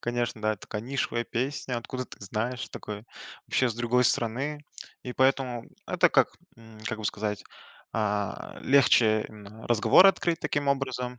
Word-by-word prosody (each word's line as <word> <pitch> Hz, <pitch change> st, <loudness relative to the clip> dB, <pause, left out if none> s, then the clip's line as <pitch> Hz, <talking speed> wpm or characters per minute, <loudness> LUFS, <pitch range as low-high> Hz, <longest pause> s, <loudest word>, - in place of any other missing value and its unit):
Конечно, 120 Hz, -1 st, -2 dB
да: 110 Hz, 0 st, +1 dB
"Такая 105 Hz, +3 st, -6 dB
нишевая 120 Hz, -2 st, -2 dB
песня, 125 Hz, 0 st, -2 dB
откуда 130 Hz, +2 st, -5 dB
ты -, -, -14 dB
знаешь, 115 Hz, +5 st, -3 dB
такой, 105 Hz, +1 st, -7 dB, 0.4 s
вообще 130 Hz, -, +2 dB
с -, -, -5 dB
другой 120 Hz, +1 st, +2 dB
страны". 135 Hz, +7 st, 0 dB, 0.4 s
И 125 Hz, -, -5 dB
поэтому 130 Hz, -2 st, +1 dB, 0.2 s
это -, -, +4 dB
как, -, -, +4 dB, 0.3 s
м, 115 Hz, -1 st, -15 dB
как 110 Hz, -, -3 dB
бы 110 Hz, -, -7 dB
сказать, 105 Hz, -1 st, -3 dB, 0.5 s
а, 105 Hz, -2 st, -2 dB
легче 115 Hz, -5 st, +4 dB
именно 105 Hz, +1 st, -12 dB
разговор 120 Hz, -, +6 dB
открыть 175 Hz, -3 st, +2 dB
таким 145 Hz, -1 st, -1 dB
образом. 125 Hz, -3 st, -1 dB
120 Hz, 150 wpm, -27 LUFS, 110-130 Hz, 0.5 s, разговор